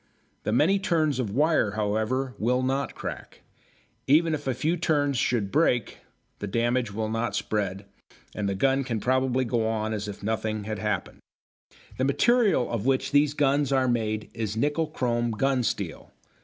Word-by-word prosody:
The - - 0
many 160 - +3
turns 160 -8 +1
of 120 -5 -1
wire, 140 -2 +2
however, 110 +5 -1
will 125 +4 +1
not 135 +2 -1
crack. - - -7 0.6
Even 160 +4 +4
if 145 -2 -4
a 130 - 0
few 165 +3 0
turns 145 -4 +1
should 115 -5 0
break, 125 -7 +1 0.4
the 105 - -4
damage 120 +2 0
will 110 +2 -2
not 115 -1 -2
spread, 100 -2 -2 0.5
and 100 -1 -2
the 100 - -1
gun 135 +6 +2
can 120 -4 -2
probably 130 +2 +1
go 115 -1 0
on 110 0 -1
as 105 -1 -3
if 100 -1 -8
nothing 110 0 -2
had 110 0 -4
happened. 100 -3 -3 0.8
The 130 - +2
material 195 - +3
of 115 0 -2
which 135 -1 +1
these 145 0 +3
guns 140 -1 +2
are 130 -1 +2
made 110 -3 -1
is 110 -2 -3
nickel 150 +6 +1
chrome 120 -3 -1
gun 130 +4 +1
steel. 120 - -3
125 Hz, 170 wpm, -26 LUFS, 110-140 Hz, 0.8 s, Even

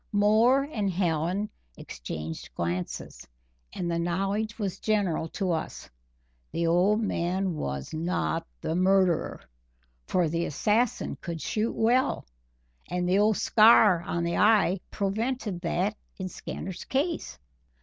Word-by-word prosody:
Moore 220 +6 +4
and 215 -9 -2
Hallen 180 +2 0 0.3
exchanged 75 +6 -7
glances; 85 -4 -4 0.4
and 175 -1 -3
the 170 - 0
knowledge 195 +5 -1
was 200 -5 -3
general 200 -7 0
to 190 0 -2
us 160 - -4 0.6
the 170 - -1
old 180 +6 +3
man 185 -1 -1
was 70 - -4
not 155 - -1
the - - -2
murderer, 185 -2 +2 0.7
for 180 -2 +2
the 170 +2 -1
assassin 215 - 0
could 170 -2 -5
shoot 215 +7 -1
well, 245 +4 +2 0.6
and 180 0 -1
the 185 +2 +3
old 215 0 +3
scar 215 -5 +6
on 170 0 -2
the 170 0 -1
eye 210 -3 +4
prevented 210 -1 -2
that 185 +4 0 0.2
in 190 - -4
Skinner's 185 +1 -6
case. 310 +5 -2
190 Hz, 125 wpm, -27 LUFS, 170-215 Hz, 0.7 s, scar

